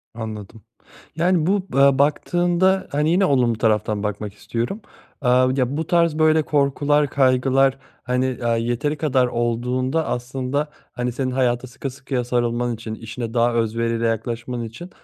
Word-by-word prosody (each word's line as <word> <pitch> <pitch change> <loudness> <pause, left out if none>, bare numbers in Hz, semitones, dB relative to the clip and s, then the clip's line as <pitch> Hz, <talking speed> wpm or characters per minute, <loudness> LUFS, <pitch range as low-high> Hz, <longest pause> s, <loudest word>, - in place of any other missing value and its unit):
Anladım. 110 -1 -7 0.5
Yani, 170 -1 +2
bu, 190 - +2 0.2
eee, 140 0 +4
baktığında, 175 +5 +2
hani, 150 +2 +1
yine 185 +3 +3
olumlu 125 -7 +2
taraftan 105 -2 0
bakmak 105 0 -4
istiyorum. 120 - -4 0.4
Eee, 125 - +2 0.3
ya, 135 +2 0
bu 160 - -3
tarz, 170 -3 +2
böyle, 155 0 +4
korkular, 145 0 +2
kaygılar, 135 0 +3 0.3
hani, 125 0 -1
aaa, 115 0 +2
yeteri 120 +6 -1
kadar 130 -5 +2
olduğunda 125 +5 -1
aslında, 130 +4 -2 0.2
hani, 125 0 -2
senin 130 +1 -2
hayata 125 -1 0
sıkı 135 +3 -6
sıkıya 130 -1 -3
sarılman 120 0 0
için, 110 0 -6
işine 115 +1 -6
daha 120 0 +2
özveriyle 115 0 0
yaklaşman 120 +2 -3
için 120 +11 -8
125 Hz, 145 wpm, -22 LUFS, 115-145 Hz, 0.5 s, eee